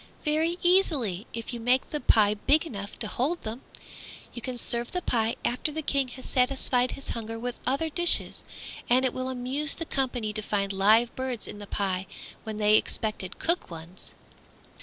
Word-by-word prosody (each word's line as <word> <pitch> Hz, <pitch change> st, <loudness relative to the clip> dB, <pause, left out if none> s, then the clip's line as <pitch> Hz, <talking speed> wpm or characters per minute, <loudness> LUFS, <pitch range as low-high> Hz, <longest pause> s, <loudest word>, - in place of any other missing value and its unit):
"Very 320 Hz, +3 st, +1 dB
easily, 290 Hz, -, +2 dB
if 230 Hz, +2 st, -5 dB
you 240 Hz, -, -4 dB
make 250 Hz, +3 st, +1 dB
the 300 Hz, -, -2 dB
pie 210 Hz, -5 st, +4 dB
big 290 Hz, +10 st, +2 dB
enough 200 Hz, -8 st, -7 dB
to 220 Hz, -, -3 dB
hold 295 Hz, +11 st, -1 dB
them. 225 Hz, +4 st, -5 dB, 0.7 s
You 240 Hz, -, -6 dB
can 255 Hz, 0 st, -4 dB
serve 235 Hz, 0 st, 0 dB
the 360 Hz, -, -1 dB
pie 225 Hz, -1 st, 0 dB
after 250 Hz, +5 st, +2 dB
the 315 Hz, +1 st, -4 dB
King 275 Hz, -2 st, +1 dB
has 260 Hz, -, -10 dB
satisfied 250 Hz, -1 st, +1 dB
his 275 Hz, -, -6 dB
hunger 225 Hz, 0 st, -4 dB
with 245 Hz, +1 st, -5 dB
other 275 Hz, +5 st, +1 dB
dishes, 345 Hz, +2 st, +3 dB, 0.5 s
and 255 Hz, +2 st, +4 dB
it 255 Hz, -, 0 dB
will 255 Hz, 0 st, -3 dB
amuse 260 Hz, +4 st, +1 dB
the 330 Hz, -, -4 dB
company 250 Hz, -7 st, -1 dB
to 215 Hz, -, -2 dB
find 200 Hz, -1 st, -1 dB
live 215 Hz, +5 st, +4 dB
birds 260 Hz, -4 st, -3 dB
in 205 Hz, -, -8 dB
the 205 Hz, -, -9 dB
pie 190 Hz, -2 st, -2 dB, 0.4 s
when 220 Hz, -1 st, -5 dB
they 210 Hz, 0 st, +5 dB
expected 215 Hz, -5 st, -2 dB
cooked 340 Hz, +2 st, 0 dB
ones." 170 Hz, +2 st, -9 dB
245 Hz, 180 wpm, -27 LUFS, 215-275 Hz, 0.7 s, they